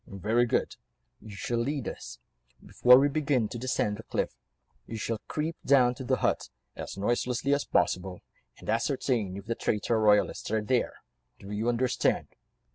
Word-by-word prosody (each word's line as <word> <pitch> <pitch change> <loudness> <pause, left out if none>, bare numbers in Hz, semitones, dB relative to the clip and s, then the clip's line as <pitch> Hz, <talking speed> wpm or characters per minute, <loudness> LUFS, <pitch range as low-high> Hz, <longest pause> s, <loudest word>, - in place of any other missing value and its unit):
"Very 110 +5 +1
good. - - 0 0.4
You 105 -2 -10
shall 120 +4 -2
lead 135 +1 -2
us. - - -7 0.5
Before 125 0 +6
we 140 +2 +4
begin 140 -5 +1
to 120 - -6
descend 115 -4 -1
the - - -8
cliff, - - -2 0.5
you 115 - -5
shall 110 0 -2
creep 155 +2 -2
down 125 -3 +5
to 130 - -8
the 125 - +1
hut, - - 0 0.3
as - - -7
noiselessly 120 +6 0
as 140 - 0
possible, 90 0 0 0.4
and - - -14
ascertain 115 -4 0
if 100 - -9
the 115 - -1
traitor 110 0 0
royalists 105 -1 +2
are 110 0 0
there? 120 +3 0 0.4
Do 100 - -10
you 110 +3 -1
understand?" 120 +1 +1
115 Hz, 165 wpm, -28 LUFS, 105-130 Hz, 0.5 s, Before